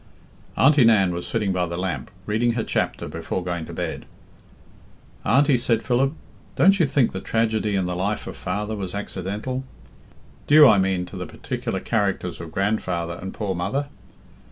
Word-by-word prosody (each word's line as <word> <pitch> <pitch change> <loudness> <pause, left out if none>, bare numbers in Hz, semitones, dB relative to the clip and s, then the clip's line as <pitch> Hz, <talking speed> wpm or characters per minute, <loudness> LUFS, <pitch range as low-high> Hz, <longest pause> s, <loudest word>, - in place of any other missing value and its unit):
Auntie 140 0 +6
Nan 100 -6 +4
was 85 0 -4
sitting 105 -4 0
by 90 -1 0
the 85 0 -4
lamp, 90 -8 -3 0.2
reading 115 +3 +1
her 115 -1 -1
chapter - - -1
before 90 - -4
going 85 -2 -3
to - - -8
bed. - - -4 1.2
"Auntie," 130 +3 +4
said 115 -2 +1
Philip, 130 +3 +1 0.4
"don't 195 +2 +5
you 165 - +4
think 135 -3 +2
the 95 - -5
tragedy 110 -2 0
in 95 -2 +1
the 90 0 -2
life 100 +4 -2
of - - -7
father 105 +4 -3
was 95 -2 -5
accidental? 105 +6 -4 0.8
Due, 150 0 +8
I 105 - +6
mean, 95 -1 +1
to 90 - -11
the 90 -1 -5
particular - - -4
characters 100 -6 -1
of 85 -1 -8
grandfather 85 -3 -1
and 95 +1 -5
poor 100 -3 -3
mother? 100 +12 -2
100 Hz, 170 wpm, -23 LUFS, 90-120 Hz, 1.2 s, Due